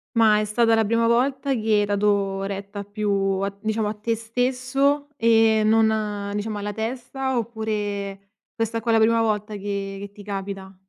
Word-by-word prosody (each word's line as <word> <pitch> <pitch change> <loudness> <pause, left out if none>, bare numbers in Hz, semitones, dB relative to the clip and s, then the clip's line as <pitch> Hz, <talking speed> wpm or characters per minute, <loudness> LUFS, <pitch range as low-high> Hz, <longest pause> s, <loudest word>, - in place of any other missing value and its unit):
Ma 215 -2 +5
è - - -1
stata 225 +1 +3
la 225 - +3
prima 230 +2 +2
volta 265 +3 +1
che 240 - -1 0.2
hai 205 - +2
dato 200 -1 +1
retta 200 +1 -5
più 205 +1 -3 0.3
a 200 0 0
t 200 0 -19
diciamo, 220 -1 -1
a 210 - -2
te 220 +2 -2
stesso 255 +5 0
e 225 -2 +4
non 215 -2 +1
diciamo 210 0 -3
alla 205 0 -4
testa? 255 +3 -3
Oppure, 205 -3 -3 0.2
questa 225 0 -2
qua 230 +1 0
è - - +4
la - - +5
prima 230 +1 +4
volta 210 -1 -1
che 200 -1 -4
che 200 0 -7
ti 205 - -12
capita? 195 -1 -6
215 Hz, 180 wpm, -23 LUFS, 205-230 Hz, 0.3 s, Ma